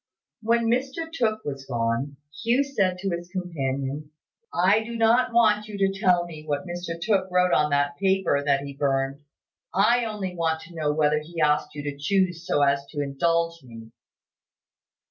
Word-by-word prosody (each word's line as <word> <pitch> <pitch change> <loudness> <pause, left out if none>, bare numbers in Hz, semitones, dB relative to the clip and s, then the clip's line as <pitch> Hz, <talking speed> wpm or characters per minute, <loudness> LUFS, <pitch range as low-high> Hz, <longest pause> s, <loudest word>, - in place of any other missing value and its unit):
When 230 +1 +2
Mr 270 +7 -1
Tooke 220 -7 -1
was 135 -1 -5
gone, 120 +3 -1 0.2
Hugh 240 +4 +3
said 195 -10 0
to 195 +1 -3
his 175 0 -4
companion, 145 -5 -3 0.4
"I 195 +5 +3
do 235 +1 -7
not 235 +3 +3
want 215 -3 +3
you 210 -1 -7
to 195 0 0
tell 180 -4 +3
me 160 -3 -9
what 145 0 -2
Mr 175 -1 -5
Tooke 190 0 +1
wrote 180 0 +3
on 150 0 +3
that 145 0 +1
paper 190 -6 +1
that 140 -1 +2
he 140 0 -7
burned. 135 0 -1 0.5
I 230 +5 +4
only 200 -5 -4
want 160 -1 0
to 170 - -13
know 155 -3 0
whether 150 0 +2
he 165 +2 -9
asked 150 -1 +1
you 145 - -5
to 145 -1 -4
choose 175 +1 0
so 145 - +2
as 140 0 +2
to 145 - -7
indulge 165 +4 0
me." 115 -2 -12
170 Hz, 175 wpm, -25 LUFS, 145-200 Hz, 0.5 s, I